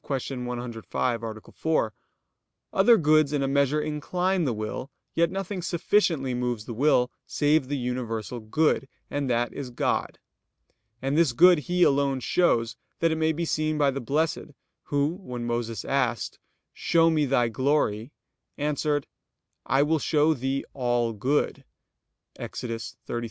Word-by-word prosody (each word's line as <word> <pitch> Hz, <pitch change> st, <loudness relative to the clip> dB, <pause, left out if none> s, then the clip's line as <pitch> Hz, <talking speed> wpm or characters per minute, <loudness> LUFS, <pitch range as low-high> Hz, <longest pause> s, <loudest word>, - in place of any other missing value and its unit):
105, 125 Hz, -3 st, -3 dB
A. 110 Hz, -1 st, -7 dB
4), 155 Hz, -9 st, 0 dB, 0.8 s
other 225 Hz, +5 st, +6 dB
goods 155 Hz, -3 st, +4 dB
in 145 Hz, -2 st, 0 dB
a -, -, +1 dB
measure 140 Hz, +2 st, +2 dB
incline 175 Hz, +4 st, -1 dB
the 130 Hz, -, +1 dB
will, 110 Hz, +4 st, -5 dB, 0.2 s
yet 170 Hz, 0 st, +2 dB
nothing 190 Hz, 0 st, -4 dB
sufficiently 170 Hz, -6 st, +1 dB
moves 120 Hz, -3 st, -2 dB
the 120 Hz, -, -6 dB
will 125 Hz, 0 st, +3 dB, 0.2 s
save 145 Hz, -2 st, +2 dB
the 145 Hz, +1 st, -2 dB
universal 120 Hz, -2 st, -3 dB
good, 135 Hz, +4 st, +1 dB, 0.2 s
and 145 Hz, -2 st, -1 dB
that 120 Hz, 0 st, 0 dB
is 140 Hz, -3 st, -6 dB
God. 120 Hz, -, -1 dB, 0.9 s
And 135 Hz, +2 st, 0 dB
this 160 Hz, -5 st, +3 dB
good 175 Hz, +5 st, +7 dB
He 180 Hz, +4 st, +1 dB
alone 140 Hz, -2 st, +2 dB
shows, 120 Hz, -6 st, +1 dB, 0.2 s
that 165 Hz, -1 st, +2 dB
it 160 Hz, -, 0 dB
may 160 Hz, 0 st, +2 dB
be 170 Hz, +2 st, -2 dB
seen 155 Hz, -1 st, 0 dB
by 145 Hz, -2 st, +3 dB
the 135 Hz, +1 st, -4 dB
blessed, 150 Hz, +3 st, -1 dB, 0.3 s
Who, 145 Hz, +4 st, 0 dB
when 125 Hz, -8 st, -5 dB
Moses 120 Hz, -2 st, -3 dB
asked: 130 Hz, -4 st, -1 dB, 0.3 s
"Show 165 Hz, -1 st, +3 dB
me 155 Hz, -3 st, +2 dB
Thy 125 Hz, -3 st, +2 dB
glory," 125 Hz, -2 st, 0 dB, 0.5 s
answered: 145 Hz, -1 st, 0 dB, 0.6 s
"I 135 Hz, +3 st, +3 dB
will 155 Hz, +1 st, +1 dB
show 150 Hz, +2 st, +3 dB
thee 135 Hz, 0 st, -2 dB
all 120 Hz, -3 st, 0 dB
good" 130 Hz, +8 st, 0 dB, 0.7 s
(Ex. -, -, -6 dB
33:18, 115 Hz, -2 st, -5 dB
19). 120 Hz, -, -2 dB
140 Hz, 145 wpm, -26 LUFS, 120-155 Hz, 0.9 s, good